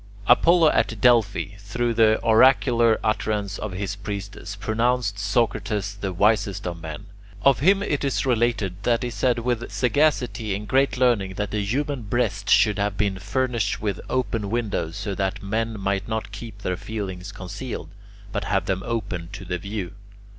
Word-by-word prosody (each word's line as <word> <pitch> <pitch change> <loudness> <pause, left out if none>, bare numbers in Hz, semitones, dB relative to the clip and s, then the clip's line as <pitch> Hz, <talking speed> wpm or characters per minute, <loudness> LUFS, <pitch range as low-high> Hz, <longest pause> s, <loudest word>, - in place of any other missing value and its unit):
Apollo 165 - +6
at 115 - 0
Delphi, 110 -4 +3
through 120 +4 -1
the 110 -1 +4
oracular 115 -1 +5
utterance 105 -2 -1
of 105 -3 -4
his 100 +1 -3
priestess, 100 0 -6
pronounced 110 0 0
Socrates 105 -1 0
the 95 - -2
wisest 100 +1 +1
of 85 -2 -4
men. 80 -2 -7 0.4
Of 135 -2 +5
him 195 +7 +4
it 145 -8 -1
is 135 -1 0
related 115 -6 0
that 115 +2 +1
he 120 - -2
said 120 +3 +1
with 120 0 -2
sagacity 125 -5 +1
and 105 +1 -6
great 135 -2 +2
learning 115 -7 +2
that 105 +1 -3
the 105 -1 -1
human 140 +5 -1
breast 105 -2 -1
should 105 -2 +4
have 100 -1 -1
been 100 -2 0
furnished 120 0 -1
with 105 -3 -2
open 115 -5 -1
windows, 105 -7 -2
so 100 0 -3
that 95 0 -2
men 110 +2 -2
might 100 0 -1
not 110 -2 -3
keep 105 0 -9
their 90 -1 -1
feelings 95 -4 -5
concealed, 110 +7 -6 0.4
but - - -3
have - - 0
them 95 -1 -1
open 100 -8 -3
to 95 - -7
the 90 0 -3
view. 100 -1 -5
105 Hz, 165 wpm, -24 LUFS, 100-120 Hz, 0.4 s, Apollo